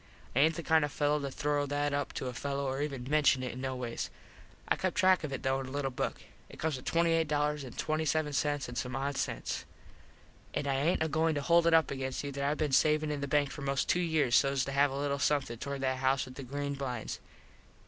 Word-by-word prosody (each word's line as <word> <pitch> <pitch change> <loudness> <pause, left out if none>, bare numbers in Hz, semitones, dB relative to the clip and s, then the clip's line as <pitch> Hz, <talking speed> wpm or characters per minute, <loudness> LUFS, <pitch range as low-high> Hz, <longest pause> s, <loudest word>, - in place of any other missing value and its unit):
I - - +3
aint 160 +3 +4
the 170 - -5
kind 160 -1 +4
of 145 - 0
a - - -14
fello 150 0 +2
to 140 -1 -3
throw 145 +1 -1
that 145 0 0
up 145 -1 -1
to - - -4
a 125 - -3
fello 140 +2 -2
or 135 +1 -2
even 140 -4 -3
menshun 140 -1 +3
it 125 - -3
in 130 - -7
no 130 -1 -2
ways. 120 -2 -4 0.6
I - - +3
kept - - -2
track 185 -2 +4
of 150 - -3
it 135 - -4
though 135 0 +1
in 135 - -5
a - - -8
little 140 -1 -1
book. 125 - -3 0.3
It - - -12
comes 160 -2 -1
to - - -9
$28.27 150 -2 0
and 125 - -7
some 125 0 -4
odd 140 +1 -2
sense. - - -2 0.9
An 145 - -1
I 140 - +1
aint 170 - +2
agoin 160 +1 +1
to 145 - -1
hold 170 +2 +4
it 165 - +6
up 160 - +4
against 130 -1 -3
you 140 - -4
that 140 0 -4
I 145 +2 +1
been 150 -2 -1
savin 150 +3 +3
in 145 -1 -3
the 140 - -2
bank 145 -1 +2
for - - -7
most 140 -1 0
two 180 - +3
years 155 -8 +2
sos 135 +1 +3
to 140 - -4
have 140 +1 +4
a 135 - -4
little 140 0 -1
somethin 140 -6 0
towards 140 +1 -4
that 130 -1 0
house 135 +1 +1
with 130 - -10
the 140 - -8
green 140 +2 -3
blinds. 130 -5 -4
140 Hz, 245 wpm, -31 LUFS, 135-150 Hz, 0.9 s, it